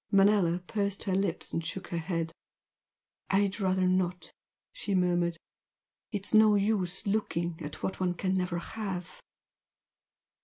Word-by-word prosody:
Manella 195 -3 +4
pursed 200 0 -1
her 190 - -1
lips 190 -3 -1
and 165 - -1
shook 185 +3 -5
her 170 - -1
head. 165 -1 -2 1.0
"I'd 200 +1 +2
rather 185 -1 +2
not!" 180 -2 0 0.4
she 200 -2 -2
murmured 175 -2 +2 0.7
"It's 205 -1 -3
no 215 -1 +7
use 195 -3 0
looking 175 -5 -1
at 150 - -7
what 190 - -2
one 180 -1 +1
can 185 +2 0
never 180 -2 0
have!" 180 -1 -5
185 Hz, 130 wpm, -30 LUFS, 175-200 Hz, 1.0 s, no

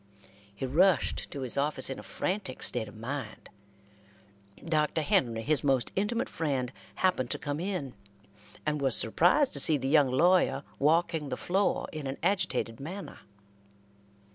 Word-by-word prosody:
He 120 - -4
rushed 165 +4 +2
to 140 - -6
his 130 +1 -1
office 145 -2 +1
in 135 - -5
a - - -7
frantic 130 - -3
state 115 -3 0
of 105 - -12
mind. 120 -1 -6 1.2
Dr. 155 -1 +1
Henry, 115 -5 +1
his 150 +3 +4
most 135 -3 +2
intimate 230 +5 0
friend, 135 -6 -2 0.2
happened 180 -10 +1
to - - -1
come 145 0 -4
in, 175 -8 -3 0.7
and 150 -1 -1
was 135 -4 +3
surprised 180 - +3
to - - -1
see 155 - +4
the 135 -1 -3
young 145 -1 +4
lawyer 155 0 +3 0.2
walking 160 0 +1
the - - -3
floor 195 +3 0
in 155 -3 -5
an 135 - -4
agitated 155 - 0
manner. 180 +8 -7
145 Hz, 150 wpm, -29 LUFS, 130-175 Hz, 1.2 s, his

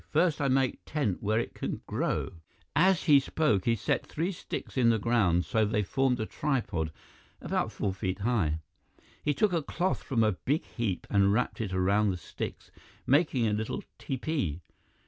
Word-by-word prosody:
First 160 -1 +2
I 140 - +2
make 130 -1 +2
tent 140 - -1
where 110 +2 +1
it 120 - -3
can - - -4
grow - - -1 0.2
" 80 - -37
As 190 -4 +1
he 145 -4 +7
spoke, 135 - +1
he 115 - +3
set 105 - 0
three 170 +5 -2
sticks 175 - -6
in 125 -3 +4
the 115 - +4
ground 100 -7 +2
so 110 +7 +2
they 105 0 +1
formed 130 +4 +1
a 110 - -1
tripod 110 - -1 0.5
about - - -1
four 100 - -2
feet 95 0 -2
high. 100 -9 +1 0.6
He 145 -1 0
took 210 -4 +2
a 165 - +2
cloth 175 +5 -1
from 120 -5 +1
a 110 - +4
big 140 - -1
heap 110 -6 -3
and 100 -1 +4
wrapped 120 +2 0
it 105 -4 -3
around 100 +3 +2
the 90 - -1
sticks, 85 - -7 0.3
making 140 -4 +3
a 105 - +1
little 110 +1 -2 0.2
tepee. 130 - -2
115 Hz, 185 wpm, -29 LUFS, 100-140 Hz, 0.6 s, he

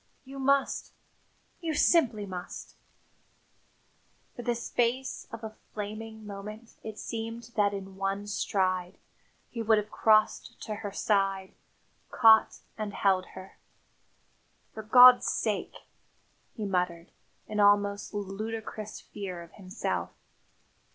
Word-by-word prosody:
You 270 +1 -9
must! 275 +1 +1 0.7
You 325 -2 -2
simply 245 -12 +3
must." 180 -2 -7 1.6
For - - -6
the 240 0 0
space 245 +2 -1
of 225 -1 -8
a 220 0 -7 0.2
flaming 215 +1 -6
moment 210 +3 -8
it 220 -1 -7
seemed 230 +1 -6
that 205 -1 +3
in 195 -1 -7
one 195 +1 -2
stride 185 -3 -1 0.5
he 230 - -4
would 220 -1 +4
have 210 0 -2
crossed 215 -1 +2
to 215 - -4
her 205 -2 -5
side, 195 -2 0 0.6
caught 220 -1 +5 0.2
and 210 -2 -4
held 190 -2 +2
her. 190 0 -11 1.1
"For 220 - -6
God's 250 +3 +8
sake - - -1 0.4
!" - - -39
he 215 - -3
muttered, 180 -3 -1 0.4
in 210 0 -3
almost 205 0 +3
ludicrous 215 +1 -5
fear 185 -4 -7
of 170 - -16
himself. 190 +1 -3
210 Hz, 115 wpm, -29 LUFS, 195-225 Hz, 1.6 s, God's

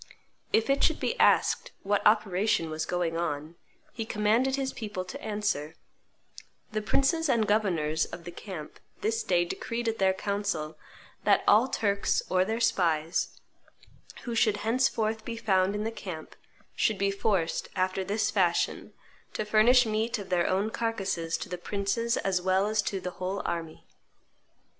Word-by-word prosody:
If 220 - +3
it 275 0 +2
should 320 - +3
be 470 - -1
asked - - +3
what 205 +1 +1
operation 210 -4 +2
was 155 0 -3
going 175 -2 -1
on, 155 -2 -3 0.4
he 225 - -3
commanded 220 +5 +1
his 270 -1 -2
people 205 -5 -5
to 185 - -8
answer, 205 -8 -2 1.0
'The 215 0 -1
princes 285 +8 +1
and 230 -4 +3
governors 170 -7 +1
of 170 - -9
the 175 - -7
camp 175 -4 -8 0.2
this 225 +1 0
day 175 -1 +2
decreed 230 +6 -4
at 225 0 -1
their 190 -1 +3
council 200 -6 -2 0.5
that - - +4
all 225 +5 +6
Turks 205 -4 0
or 185 0 +4
their 220 +4 -2
spies 165 -7 +1 0.8
who 240 - -4
should 215 -2 +3
henceforth 225 -2 +1
be 230 0 -5
found 195 -3 +2
in 210 - -2
the 225 - -2
camp 180 -8 -8 0.4
should 215 - +1
be 200 0 +1
forced, 195 -4 0
after 185 0 0
this 205 +3 0
fashion, 180 -4 0 0.4
to 215 - -2
furnish 235 +4 +5
meat 220 +2 0
of 200 -3 -8
their 175 -2 +2
own 195 +4 0
carcasses 195 -8 -2
to - - -6
the 180 -1 -5
princes 205 +5 -1
as 190 -2 0
well 190 +2 +2
as 215 0 +1
to 195 -1 -3
the 180 - -5
whole 190 +2 -2
army! 165 -2 -4
205 Hz, 160 wpm, -28 LUFS, 180-220 Hz, 1.0 s, all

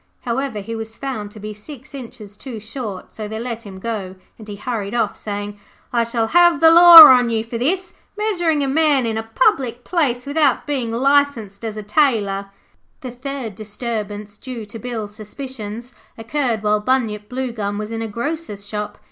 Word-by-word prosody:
However, 245 -3 -3
he 225 +3 -6
was 225 0 -7
found 255 -7 -5
to 210 - -13
be 215 +1 -6
six 260 +6 -12
inches 230 -6 -9
too 235 0 -8
short, 215 -3 -7
so 215 -1 -6
they 220 +1 -5
let 230 -1 -5
him 190 -1 -9
go, 195 -3 -5 0.2
and 215 - -11
he 205 - -6
hurried 215 -1 -4
off, 225 -4 0
saying, 205 0 -6 0.3
'I 235 -1 +3
shall 230 -1 -1
have 345 0 +5
the 325 0 +7
Law 340 -1 +12
on 250 -4 +7
you 225 -1 0
for 230 0 -6
this, 365 +9 -1 0.2
measuring 345 -8 0
a - - -1
man 290 -2 +2
in 225 -1 -1
a 225 - -1
public 245 -2 +2
place 275 -8 0
without 285 -2 +1
being 270 -6 -2
licensed 250 -5 +1
as 220 -1 -4
a 215 - -5
tailor.' 210 -5 +1 0.5
The 255 - -6
third 250 -2 -6
disturbance 210 -1 -6
due 245 -4 -7
to 215 +2 -10
Bill's 220 -3 -5
suspicions 230 +1 -7 0.2
occurred 230 -1 -2
while 210 0 +2
Bunyip 210 -3 -1
Bluegum 235 -6 -3
was 215 +1 -5
in 225 0 -4
a 225 - -3
grocer's 235 -3 -5
shop. 210 0 -5
230 Hz, 180 wpm, -20 LUFS, 210-270 Hz, 0.5 s, Law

